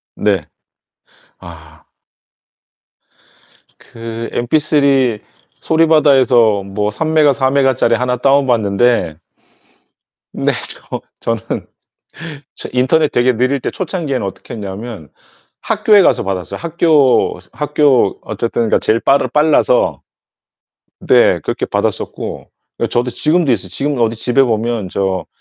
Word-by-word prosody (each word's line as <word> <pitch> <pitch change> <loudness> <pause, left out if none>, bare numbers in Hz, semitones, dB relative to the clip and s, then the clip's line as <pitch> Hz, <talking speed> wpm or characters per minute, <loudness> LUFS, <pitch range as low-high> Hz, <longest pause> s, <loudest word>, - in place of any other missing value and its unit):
네. 95 -7 -1 0.9
아. 80 -3 -14 1.9
그 115 0 -8
MP3 135 -3 +1 0.4
소리바다에서 135 -10 +3
뭐 105 +2 -3
3MB 155 +2 +2
4MB 135 0 +1
짜리 115 -1 +2
하나 125 +1 -1
다운받는데 120 - +1 1.2
네. - - 0 0.2
저 - - -7 0.2
저는 115 -2 -3 0.9
저 - - -6
인터넷 145 +5 +2
되게 125 +1 +2
느릴 130 +4 0
때 - - -4
초창기에는 160 - -3
어떻게 95 -1 -8
했냐면 100 - -8 0.5
학교에 215 -1 +3
가서 - - +2
받았어요. 95 -2 -4
학교 160 -5 +2
학교 150 -3 +1
어쨌든 115 0 -2
그러니까 - - +2
제일 110 +1 +1
빠르 135 0 +2
빨라서. 160 - +2 1.1
네, - - +4
그렇게 - - -3
받았었고. - - -4 0.3
그러니까 - - -1
저도 120 +1 0
지금도 155 +2 +1
있어요. 95 -4 -2
지금 140 +8 -3
어디 115 -1 +1
집에 125 +4 +2
보면 115 -3 -2
저 95 -1 -2
125 Hz, 250 characters per minute, -15 LUFS, 110-150 Hz, 1.9 s, 네